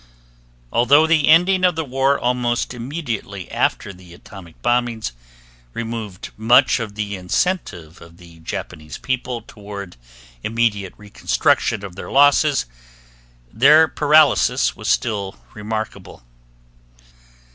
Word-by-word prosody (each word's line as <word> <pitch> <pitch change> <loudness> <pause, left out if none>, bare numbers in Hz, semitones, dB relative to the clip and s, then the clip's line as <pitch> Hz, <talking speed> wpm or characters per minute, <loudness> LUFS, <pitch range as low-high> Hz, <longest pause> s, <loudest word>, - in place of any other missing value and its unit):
Although 140 +6 +5
the 160 -2 +2
ending 180 +4 +4
of 180 -2 +3
the 160 -1 -3
war 135 +1 +1
almost 120 0 -1
immediately 120 - -6
after 100 - -1
the 90 -1 -15
atomic 85 -2 -14
bombings 120 - 0 0.6
removed 115 -5 -6
much 115 +4 +4
of 110 -3 -6
the 105 -1 -4
incentive 90 - -3
of 85 0 -15
the 85 -2 -16
Japanese 75 -1 -7
people 125 -3 -4
toward 100 - -10 0.5
immediate 110 -4 -1
reconstruction 105 +1 0
of 90 -3 -10
their - - -8
losses, 145 +1 +3 0.9
their 150 +6 +6
paralysis 150 -2 +3
was - - -8
still 100 -4 -1 0.2
remarkable. 110 - -6
115 Hz, 110 wpm, -20 LUFS, 100-140 Hz, 0.9 s, their